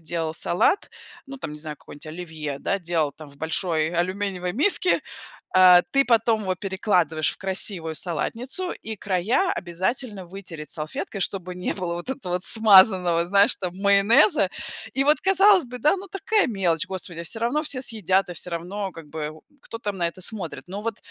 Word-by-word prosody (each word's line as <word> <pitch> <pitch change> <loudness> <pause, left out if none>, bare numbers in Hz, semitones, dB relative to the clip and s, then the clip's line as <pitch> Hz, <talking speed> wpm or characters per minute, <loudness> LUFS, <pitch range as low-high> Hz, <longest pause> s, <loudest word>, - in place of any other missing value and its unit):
делал 165 -1 -3
салат, 175 - +1 0.4
ну 275 0 -8
там 150 - -6
не 150 - -7
знаю, 150 -1 -6
какое-нибудь 145 +2 -12
оливье, 155 -3 -6
да, 195 +7 -1
делал 165 -4 -1
там 155 0 -12
в 140 - -18
большой 160 0 0
алюминиевой 180 +1 -2
миске, 350 - +2 0.6
э, 180 -1 +8
ты 275 0 +4
потом 225 -2 +2
его 190 -2 -1
перекладываешь 180 -5 0
в - - -12
красивую 190 -4 -3
салатницу, 240 - -2
и 220 0 -7
края 205 - 0
обязательно 190 +3 -3
вытереть 170 -5 -9
салфеткой, 155 +5 -5
чтобы 185 -1 -3
не 180 0 -3
было 180 -3 -3
вот 175 +9 -5
этого 215 -10 -4
вот 180 +1 -2
смазанного, 190 -5 +6
знаешь 200 +2 +4
там, 180 -1 -5
майонеза. 200 - +4 0.4
И 270 +1 +2
вот 300 +2 +3
казалось 385 0 +5
бы, 250 0 -9
да, 300 - +3
ну 390 +1 -9
такая 405 +3 +1
мелочь, 180 -8 0
господи, 180 -3 -5
всё 170 +6 -2
равно 250 +7 0
все 280 -4 0
съедят, 195 -6 +1
и - - -6
всё 180 - -2
равно, 185 +4 -4
как 165 -2 -11
бы, 150 0 -5
о, 155 - -14 0.2
кто, 230 - -8
там, 205 -3 -4
на 170 -1 +1
это 170 - -12
смотрит. 185 -3 -4
Но 200 +3 -6
вот 225 -1 -3
185 Hz, 180 wpm, -24 LUFS, 170-225 Hz, 0.6 s, э